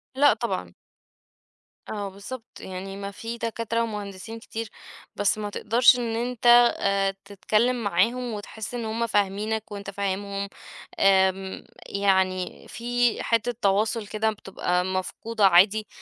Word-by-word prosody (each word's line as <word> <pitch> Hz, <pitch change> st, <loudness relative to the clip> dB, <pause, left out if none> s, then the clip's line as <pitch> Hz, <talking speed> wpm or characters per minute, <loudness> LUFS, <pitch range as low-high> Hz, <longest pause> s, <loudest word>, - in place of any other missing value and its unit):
لأ، 290 Hz, +2 st, +6 dB
طبعًا. 90 Hz, -, -3 dB, 1.2 s
آه، 205 Hz, -2 st, -3 dB
بالضبط، 215 Hz, +5 st, -8 dB
يعني 190 Hz, +1 st, -7 dB
ما 200 Hz, 0 st, -5 dB
فيه 230 Hz, +4 st, -6 dB
دكاترة 230 Hz, 0 st, -1 dB
ومهندسين 210 Hz, 0 st, -6 dB
كتير، 225 Hz, -1 st, -6 dB, 0.5 s
بس 205 Hz, +1 st, +1 dB
ما 210 Hz, -1 st, -3 dB
تقدرش 235 Hz, +5 st, +4 dB
إن 230 Hz, -2 st, -2 dB
أنت، 245 Hz, +1 st, -3 dB, 0.3 s
آآ، 195 Hz, 0 st, +1 dB
تتكلم 220 Hz, +5 st, 0 dB
معاهم 230 Hz, +6 st, +1 dB
وتحس 215 Hz, +2 st, -7 dB
إن 240 Hz, -2 st, -3 dB
هُم 225 Hz, +1 st, -1 dB
فاهمينك 210 Hz, +1 st, -1 dB
وأنت 200 Hz, -1 st, -6 dB
فاهمهم، 200 Hz, 0 st, -3 dB, 0.5 s
آمم، 190 Hz, 0 st, +3 dB, 0.3 s
يعني 190 Hz, -2 st, 0 dB
فيه 245 Hz, 0 st, 0 dB
حتة 230 Hz, +1 st, +1 dB
تواصل 210 Hz, +2 st, +1 dB
كده 220 Hz, +1 st, 0 dB
بتبقى 180 Hz, -3 st, -2 dB
مفقودة 195 Hz, +3 st, 0 dB
عادي، 195 Hz, +4 st, +5 dB
210 Hz, 125 wpm, -25 LUFS, 195-230 Hz, 1.2 s, لأ